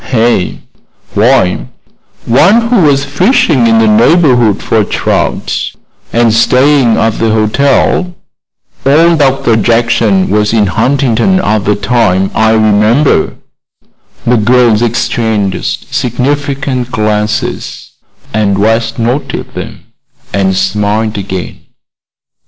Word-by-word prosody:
"Eh? 115 -5 +1 0.6
Why, 105 -4 +1 0.6
one 195 - +3
who 245 - +2
was 145 -6 +2
fishing 180 - +1
in 115 0 +3
the 110 0 +3
neighborhood 120 - +2
for 110 -1 +1
trout, - - -2 0.4
and 115 -1 +2
staying 130 +1 +2
at 115 -1 0
the 115 - +1
hotel. 135 - 0 0.7
Old 160 +4 +3
Dr. 135 -4 +1
Jackson 115 -3 +1
was 105 +1 +1
in 110 -2 +2
Huntington 135 - 0
at 110 - -1
the 105 - +1
time, 100 -3 0
I 110 0 +2
remember." 110 +6 +2 0.9
The 120 +1 +2
girls 120 0 +2
exchanged 110 -4 -2
significant 135 0 -2
glances, 105 -2 -3 0.4
and 100 -2 0
West 115 +2 0
noted 120 +5 -3
them - - -8 0.5
and 95 -1 0
smiled 105 +3 -1
again. 95 -2 -6
115 Hz, 105 wpm, -10 LUFS, 105-135 Hz, 0.9 s, one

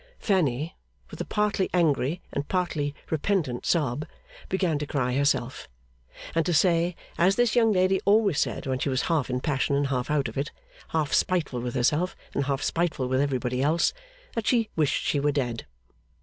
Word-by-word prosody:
Fanny, 160 - 0 0.4
with - - -7
a - - -3
partly 210 -3 0
angry 160 -1 +1
and 140 0 -2
partly 155 -6 -1 0.2
repentant 160 -6 0
sob, 150 -2 0 0.4
began 180 -5 0
to 150 - -4
cry 125 -4 0
herself, 135 -2 0 0.6
and 165 - +2
to 175 0 0
say 170 +1 +3 0.2
as 185 +3 +4
this 240 -1 +2
young 225 -2 +4
lady 185 -1 +2
always 200 -5 +3
said - - -1
when 130 -1 -1
she 140 - 0
was 130 -1 0
half 160 -7 0
in 125 0 -1
passion 140 0 0
and 140 -1 +1
half 125 -1 -1
out 145 -3 +1
of 115 +4 -5
it, 140 - -2 0.4
half 155 -3 -1
spiteful 165 -9 +1
with 120 +1 -4
herself 150 +8 +1 0.2
and 140 - 0
half 140 0 -1
spiteful 165 -6 0
with 130 +1 +1
everybody 130 -2 -1
else 155 +5 +2 0.4
that 230 -1 -3
she 230 -3 +2
wished 155 -3 +1
she 145 - +1
were 145 +1 +2
dead. 125 -5 -2
150 Hz, 180 wpm, -26 LUFS, 135-180 Hz, 0.6 s, as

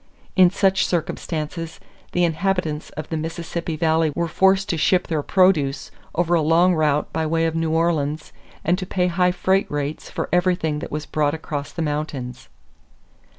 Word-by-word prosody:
In 185 -2 +7
such 190 0 +2
circumstances, 165 -1 -3 0.3
the 180 - +1
inhabitants 170 -2 -1
of 155 - -5
the 160 - -2
Mississippi 165 +1 -4
Valley 160 0 +2
were 170 - 0
forced 190 +4 +3
to 170 - +1
ship 180 +4 +2
their 155 -3 -1
produce 155 -6 +2 0.2
over 175 0 +1
a 170 - +4
long 170 +4 +4
route 150 -2 +1
by 160 -1 0
way 165 +1 +1
of 165 - 0
New 165 0 -1
Orleans 160 -2 0 0.3
and 175 +3 +2
to 185 - -5
pay 180 -1 0
high 180 0 +2
freight 190 +2 +1
rates 145 +1 -4
for - - -3
everything 175 -4 +1
that - - -7
was 150 +1 -3
brought 150 0 0
across 145 -2 -5
the 165 - -3
mountains. 145 -4 -4
165 Hz, 170 wpm, -22 LUFS, 155-180 Hz, 0.3 s, In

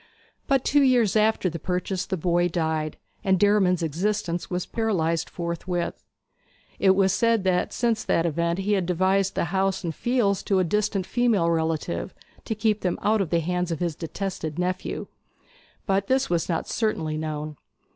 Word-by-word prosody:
But 270 -2 +2
two 290 +1 +4
years 245 -7 +3
after 215 -2 +3
the 170 -1 -3
purchase 180 +2 -2
the 190 - -2
boy 175 +1 +2
died, 160 -3 -2 0.3
and 190 -3 +2
Derriman's 195 -4 +3
existence 175 +2 -1
was 180 -1 -2
paralyzed 170 -8 0
forthwith. 170 0 -3 0.8
It 190 -1 +5
was 190 -1 +3
said 230 0 +2
that 180 -1 +1
since 230 -3 0
that 165 - +2
event 170 +1 0
he 195 +2 0
had 190 -4 0
devised 190 +2 +1
the - - +1
house 195 0 +1
and 165 -2 -2
fields 220 - +1
to 195 - +2
a 185 - +3
distant 200 +1 0
female 220 -9 +2
relative, 160 - -2 0.3
to 220 - -2
keep 215 -1 +1
them 180 -2 0
out 215 0 +3
of 185 - -2
the 170 0 +2
hands 180 +2 -1
of 165 - -1
his 170 -1 -2
detested 165 -2 -4
nephew; 180 +1 -2 0.8
but 195 -1 +1
this 260 -6 +1
was 170 0 0
not 165 - -1
certainly 160 -9 -1
known. 155 -1 -4
185 Hz, 170 wpm, -25 LUFS, 170-205 Hz, 0.8 s, It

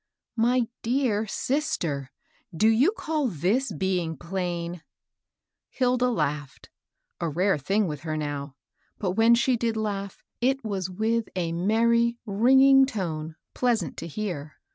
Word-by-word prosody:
" - - -64
My 245 -1 +2
dear 230 -3 0
sister 210 - -2 0.4
1 165 - -11
do 215 - +4
you 250 - +4
call 310 - -1
this 210 - 0
being 175 -2 -1
plain? 175 0 -4 0.5
" - - -63
Hilda 250 -1 +1
laughed, 145 - -3 0.2
— - - -25
a 170 - 0
rare 180 +2 +1
thing 200 +9 +1
with 150 -3 -4
her 155 0 -4
now, 145 -2 -4 0.2
— - - -43
but 190 -4 -1
when 225 +4 +5
she 245 +2 +2
did 230 -1 -1
laugh, 200 -2 -4 0.2
it 265 +2 +1
was 190 -3 -2
with 220 +4 -1
a 170 -3 -1
merry, 235 +6 +2
ring 235 +6 +4
ing 270 0 +7
tone 160 - -4 0.2
pleasant 225 - 0
to - - -5
hear. 165 -5 -5
205 Hz, 155 wpm, -26 LUFS, 170-240 Hz, 0.5 s, ing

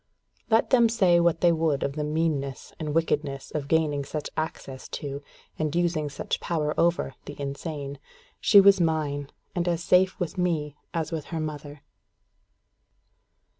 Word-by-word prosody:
Let 225 0 +3
them 240 -3 +6
say 190 -7 +4
what 170 -1 +2
they 175 - +5
would 160 -4 +1
of 140 - -1
the 150 +1 -3
meanness 150 -3 -2
and 150 -2 -3
wickedness 150 -4 -1
of 145 -2 -3
gaining 150 -2 +1
such 150 +2 -5
access 135 -4 -5
to, 140 -1 -5 0.4
and 155 0 -1
using 170 -4 +1
such 140 - -3
power 155 -3 -1
over, 170 -5 +1
the 145 - -9
insane 140 0 -5 0.4
she 205 - +7
was 195 -1 +6
mine, 150 -4 0 0.2
and 175 -1 -1
as 170 -1 0
safe 185 +1 +3
with 180 0 -3
me 155 -5 0 0.2
as 165 -1 -2
with 160 -2 -3
her 165 - -4
mother. 150 -2 -6
155 Hz, 155 wpm, -26 LUFS, 145-170 Hz, 0.4 s, she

